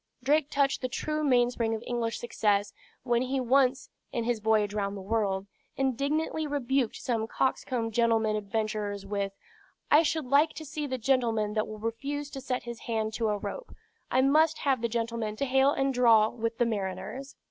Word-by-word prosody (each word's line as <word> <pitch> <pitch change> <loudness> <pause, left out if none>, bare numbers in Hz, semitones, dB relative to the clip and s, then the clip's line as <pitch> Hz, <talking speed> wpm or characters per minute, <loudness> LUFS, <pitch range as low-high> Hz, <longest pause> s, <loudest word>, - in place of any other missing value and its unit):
Drake 295 0 +2
touched 280 -1 +1
the 255 - -2
true 305 +4 -2
mainspring 245 -4 +2
of 220 - -7
English 235 -2 -2
success 205 -3 0 0.3
when 240 -2 +1
he 260 +1 -1
once 260 +2 +2 0.2
(in 235 - -1
his 235 -1 0
voyage 215 -1 +2
round 200 -1 -2
the - - -7
world) 195 -1 -1 0.3
indignantly 285 +4 0
rebuked 270 -4 0
some 225 -3 -2
coxcomb 240 -2 -1
gentleman 225 -1 +2
adventurers 210 -1 -2
with, 200 -1 -2 0.6
"I 300 - +8
should 315 -2 -1
like 285 +5 +3
to 315 - -8
see 295 0 -4
the 260 -1 -2
gentleman 230 -4 +1
that 215 0 0
will 215 - -7
refuse 280 +7 -4
to 270 - -6
set 255 -1 -2
his 235 -1 -7
hand 220 -1 -2
to 225 -1 0
a 210 - 0
rope. 475 - -7 0.3
I 260 - +3
must 310 +4 +4
have 270 -4 +1
the 235 - 0
gentlemen 230 -2 -2
to 275 - -1
hale 265 +1 +4
and 270 -1 0
draw 230 -3 +5
with 230 -1 -3
the 240 - +3
mariners." 205 +5 -4
235 Hz, 180 wpm, -28 LUFS, 220-270 Hz, 0.6 s, I